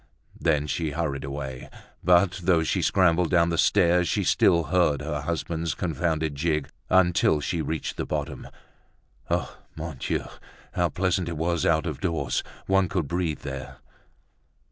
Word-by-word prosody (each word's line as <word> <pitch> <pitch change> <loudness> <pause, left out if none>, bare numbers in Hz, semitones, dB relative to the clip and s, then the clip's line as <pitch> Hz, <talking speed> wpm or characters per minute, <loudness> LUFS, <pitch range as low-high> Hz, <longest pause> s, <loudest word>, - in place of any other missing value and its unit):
Then 75 -2 +1
she 75 +3 -2
hurried 75 -4 -2
away. 70 -2 -6 0.3
But 90 +1 +4
though 85 -3 +4
she - - 0
scrambled 90 -2 +3
down 85 -2 +3
the 85 - 0
stairs, 90 -3 +4
she - - +1
still 85 -1 +4
heard 80 -2 +2
her 75 -1 -3
husband's 80 +1 -2
confounded 80 -2 -1
jig 75 0 -1 0.2
until 90 -4 +4
she 85 +3 -2
reached 80 -2 -3
the - - -2
bottom. - - -4 0.8
Ah! - - -1 0.2
Mon 80 -3 -6
Dieu! - - -1 0.5
how - - +1
pleasant 90 -1 0
it 85 - -4
was 85 +1 0
out 80 0 +2
of 80 -5 -4
doors, 80 -8 -1 0.2
one 95 -2 +2
could 85 -5 -1
breathe 85 -1 -2
there! 70 -1 -7
80 Hz, 150 wpm, -26 LUFS, 75-90 Hz, 0.8 s, But